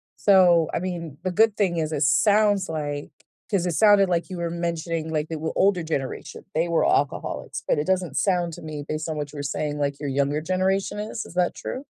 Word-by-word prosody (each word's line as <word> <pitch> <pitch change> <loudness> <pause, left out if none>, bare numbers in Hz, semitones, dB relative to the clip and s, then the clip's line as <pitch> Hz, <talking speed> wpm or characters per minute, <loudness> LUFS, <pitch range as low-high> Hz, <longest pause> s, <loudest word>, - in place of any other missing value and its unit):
So, 175 -5 +5
I - - 0
mean, 170 -5 -5
the 185 - -1
good 215 +3 +3
thing 190 -5 +1
is 155 -1 -1
it 150 -1 0
sounds 205 - +3
like 145 -2 -4 0.4
'cause 190 -5 +1
it 170 - -1
sounded 205 -1 +6
like 175 +1 0
you 185 - -4
were 170 -1 -2
mentioning, 170 -1 -3
like, 155 -1 -1
they 165 - -3
were 160 +1 -3
older 190 -3 +3
generation, 140 -5 -4
they 165 +2 +2
were 170 -1 +2
alcoholics, 145 - -1
but - - +2
it 150 - 0
doesn't 180 -5 0
sound 175 -4 +1
to - - -9
me 155 -2 -6
based 155 +1 -3
on 160 -1 -3
what 145 -1 -4
you - - -8
were 145 - -4
saying, 145 +1 -2
like, 140 -1 -1
your 145 -1 -3
younger 140 +2 0
generation 190 +4 0
is, 215 +2 -4
is - - -13
that 180 -1 +2
true? 265 +3 -6
170 Hz, 225 wpm, -24 LUFS, 150-185 Hz, 0.4 s, sounded